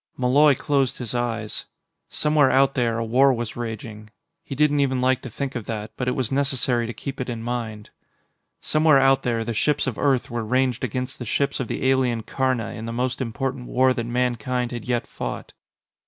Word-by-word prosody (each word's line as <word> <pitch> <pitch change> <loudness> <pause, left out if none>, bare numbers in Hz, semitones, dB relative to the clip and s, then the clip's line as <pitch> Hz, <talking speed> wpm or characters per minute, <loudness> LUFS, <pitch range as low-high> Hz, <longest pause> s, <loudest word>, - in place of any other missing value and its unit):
Malloy 140 +3 +5
closed 135 -1 0
his 120 -2 -5
eyes. 115 -3 -2 0.4
Somewhere 150 -2 +3
out 135 +1 +4
there, 115 -3 0
a 115 - -1
war 130 +5 +4
was 120 -3 -3
raging. 110 -2 -6 0.3
He 135 - -6
didn't 145 0 +3
even 130 -2 +1
like 130 0 +2
to 130 - -7
think 135 +4 -4
of 120 -4 -5
that, 110 -1 -5
but 125 - -3
it 125 - +1
was 130 -2 -2
necessary 135 -4 +1
to - - -3
keep 135 +2 -6
it 125 - -4
in 115 -2 -4
mind. 115 -3 -4 0.7
Somewhere 155 -1 +4
out 135 0 +4
there, 115 -2 -1
the 115 +1 -3
ships 145 +7 +1
of 125 -7 -3
Earth 135 -5 +1
were 120 -1 -2
ranged 130 +2 0
against 130 +2 -3
the 120 - -5
ships 140 +5 0
of - - -2
the - - -3
alien 125 -4 +2
Karna 130 -4 -1
in 110 - -7
the - - -3
most 125 +2 -2
important 130 +1 -3
war 130 0 +3
that 120 -2 -3
Mankind 125 0 -1
had 120 -3 -6
yet 120 -1 0
fought. - - -6
125 Hz, 200 wpm, -23 LUFS, 115-135 Hz, 0.7 s, Malloy